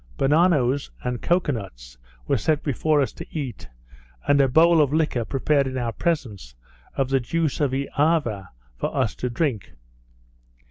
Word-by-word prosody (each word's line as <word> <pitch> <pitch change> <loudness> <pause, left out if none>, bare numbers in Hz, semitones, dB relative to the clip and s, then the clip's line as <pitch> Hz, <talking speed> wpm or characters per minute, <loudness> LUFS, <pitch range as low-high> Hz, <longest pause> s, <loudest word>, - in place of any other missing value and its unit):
Bananoes 145 -3 +2
and 125 -1 -3
cocoa 175 -3 +1
nuts 65 - -8 0.3
were - - +2
set 155 -2 0
before 150 +2 +1
us 135 - -1
to - - -9
eat, 135 - -6 0.6
and 140 0 +5
a 135 - +4
bowl 160 +4 +5
of 140 -2 +2
liquor 150 -6 +1
prepared 140 +3 +1
in 130 0 -4
our 120 -2 -1
presence 105 - -3 0.4
of 135 - 0
the 135 0 +2
juice 155 +4 -1
of 145 - +2
Eava 140 - 0 0.3
for - - -3
us - - +1
to 125 - -4
drink. 120 - -2
140 Hz, 155 wpm, -23 LUFS, 120-155 Hz, 0.6 s, and